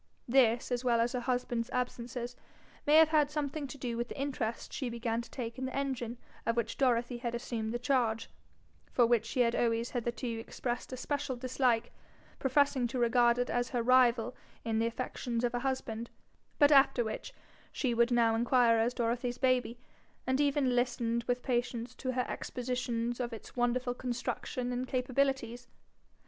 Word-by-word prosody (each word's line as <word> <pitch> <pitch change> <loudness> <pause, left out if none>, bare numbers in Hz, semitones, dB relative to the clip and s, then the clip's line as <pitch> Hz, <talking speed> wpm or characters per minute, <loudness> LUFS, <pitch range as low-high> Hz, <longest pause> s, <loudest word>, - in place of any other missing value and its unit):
This, 240 -1 +3
as 245 0 0
well 240 -2 +3
as 235 +1 +2
her 250 - 0
husband's 245 -1 -1
absences, 245 0 -3 0.5
may 295 - +6
have 320 0 +8
had 300 -2 +3
something 295 -1 -3
to 280 - -9
do 240 -3 -3
with 240 0 -2
the - - -7
interest 255 -5 -3
she 260 -4 -2
began 235 0 -2
to 235 - -12
take 235 -1 -5
in 260 - -2
the 260 - -4
engine 250 -4 -2 0.3
of 230 0 0
which 235 - -1
Dorothy 245 -2 +1
had 235 -1 -3
assumed 230 -2 -3
the 240 - -1
charge, 240 -3 +1 0.6
for 245 - +4
which 230 -1 +2
she 250 - 0
had 235 -1 +3
always 230 0 +1
hitherto 240 +1 -3
expressed 240 +2 -4
a 255 - -5
special 285 0 -2
dislike, 245 -2 0 0.5
professing 265 -1 +2
to 255 +2 -4
regard 240 0 +4
it 245 0 -1
as 245 0 0
her 240 -2 -1
rival 245 -1 +4 0.3
in 225 -1 0
the 230 - +2
affections 235 0 -3
of 240 - +2
her 245 - -1
husband, 240 -3 -3 0.5
but 290 -1 +6
after 270 -3 +6
which 220 -1 -5 0.4
she 255 -4 0
would 235 +1 +3
now 235 -2 +3
inquire 235 0 +4
as 235 +2 +1
Dorothy's 240 +1 -1
baby, 250 -2 +1 0.5
and 260 +2 +1
even 280 -3 +2
listen 235 -1 +1
with 245 0 0
patience 240 -1 -1
to 255 -1 -2
her 250 0 0
expositions 240 -1 -3
of 240 -1 -3
its 225 - -10
wonderful 245 0 +1
construction 245 0 -3
and 250 +1 -2
capabilities. 255 -2 -1
245 Hz, 175 wpm, -32 LUFS, 235-255 Hz, 0.6 s, have